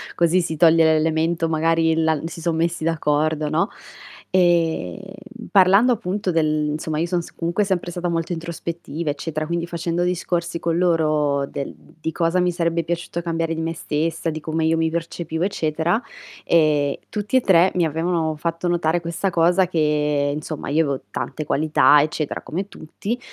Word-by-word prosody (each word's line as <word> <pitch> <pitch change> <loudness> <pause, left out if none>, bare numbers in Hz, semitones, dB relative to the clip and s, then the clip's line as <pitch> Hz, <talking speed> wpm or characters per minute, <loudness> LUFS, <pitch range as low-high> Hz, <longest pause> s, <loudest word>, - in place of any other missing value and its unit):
così 175 +2 +3
si 160 -2 -3
toglie 165 0 +6
l'elemento 160 +1 +2
magari 160 0 +2
la 160 -1 +1
si 165 0 -7
son 160 -1 0
messi 170 -1 0
d'accordo, 150 -1 0
no, 165 +7 +1 0.6
ehm, 175 -1 +2 0.5
parlando 200 +5 +5
appunto 200 -3 -2
del 155 -2 +1
insomma, 155 +1 -3
io 170 - +1
son 175 0 0
s - - -12
comunque 175 +5 0
sempre 180 -3 -1
stata 175 +1 -3
molto 165 0 -2
introspettiva 170 -1 -5
eccetera, 155 +1 -4
quindi 170 +1 -2
facendo 170 0 -2
discorsi 175 -1 -1
con 165 0 -1
loro 155 -5 +2
del 140 0 -5 0.3
di 160 - -2
cosa 165 +3 +1
mi 180 0 +2
sarebbe 170 -1 0
piaciuto 170 +1 -3
cambiare 165 -1 -2
di 165 - -3
me 165 0 -2
stessa, 160 +1 -2
di 155 - -5
come 160 +1 -2
io 160 +1 +3
mi 160 0 +1
percepivo 165 0 -3
eccetera, 170 +1 0 0.4
ehm, 150 -4 +3
tutti 210 +3 -3
e 260 - +5
3 185 -3 +4
mi 175 -2 +2
avevano 160 0 -1
fatto 165 +2 -2
notare 175 -1 +1
questa 170 +3 -2
cosa 175 +2 +3
che, 150 -3 +1
insomma, 150 0 -5
io 155 +3 +3
avevo 140 -2 -2
tante 155 - -4
qualità 150 0 +4
eccetera 155 0 -2
come 185 +5 -4
tutti, 205 +9 -5
165 Hz, 165 wpm, -22 LUFS, 155-175 Hz, 0.6 s, toglie